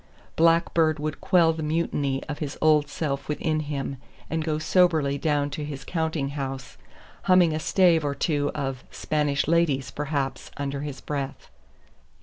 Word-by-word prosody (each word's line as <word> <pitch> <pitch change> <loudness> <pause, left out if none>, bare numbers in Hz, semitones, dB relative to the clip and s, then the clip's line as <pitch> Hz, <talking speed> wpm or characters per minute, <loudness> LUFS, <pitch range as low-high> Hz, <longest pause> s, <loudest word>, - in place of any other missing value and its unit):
Blackbeard 165 -1 +3
would 150 0 -4
quell 170 -3 +4
the 160 - -5
mutiny 150 -3 -1
of 145 -2 -6
his 145 -2 -4
old 150 -2 +4
self 140 -2 -3
within 155 +1 0
him 140 -2 -4 0.3
and 160 -1 0
go 155 -1 -1
soberly 155 -4 +2
down 145 -2 0
to 150 +2 -4
his 140 -2 -6
counting 160 -3 -2
house 135 -2 -5 0.5
humming 185 -4 +5
a 155 - -1
stave 170 -1 +3
or 140 -1 -1
two 145 -3 0
of 135 -3 -3
"Spanish 145 -2 -1
Ladies," 160 -5 +2
perhaps, 140 -2 -3
under 140 -1 -3
his 145 -2 -6
breath. 140 -2 -5
150 Hz, 150 wpm, -25 LUFS, 140-160 Hz, 0.5 s, humming